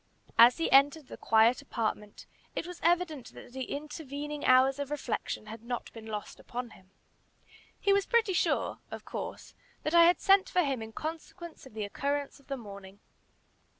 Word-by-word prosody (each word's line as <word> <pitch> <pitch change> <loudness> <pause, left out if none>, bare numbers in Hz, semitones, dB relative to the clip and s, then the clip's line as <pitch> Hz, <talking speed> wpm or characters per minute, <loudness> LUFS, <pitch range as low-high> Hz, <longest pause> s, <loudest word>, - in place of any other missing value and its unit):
As 235 +2 +8
he 330 - -1
entered 280 +1 +4
the - - -7
quiet 225 +4 +3
apartment, 215 -5 -4 0.3
it - - -2
was 355 0 -8
evident 340 -6 0
that 245 - -12
the 260 -1 -4
intervening 295 0 -6
hours 260 +2 +5
of 285 -1 -3
reflection 270 -6 -3
had 215 +1 -9
not 240 +1 -5
been 225 -1 -10
lost 210 -1 -6
upon 245 -1 -6
him. 190 0 -18 0.9
He 400 - +3
was 400 0 +2
pretty 455 -5 +2
sure, - - 0
of - - -8
course, - - -6 0.3
that 305 - -2
I 340 0 +8
had 350 +1 +4
sent 390 0 +4
for 360 -1 +2
him 270 -5 -1
in 220 0 -7
consequence 325 +3 -7
of 220 - -17
the 215 -1 -2
occurrence 280 +7 -3
of 280 - -24
the 275 - -3
morning. 200 -3 -11
275 Hz, 180 wpm, -30 LUFS, 230-320 Hz, 0.9 s, As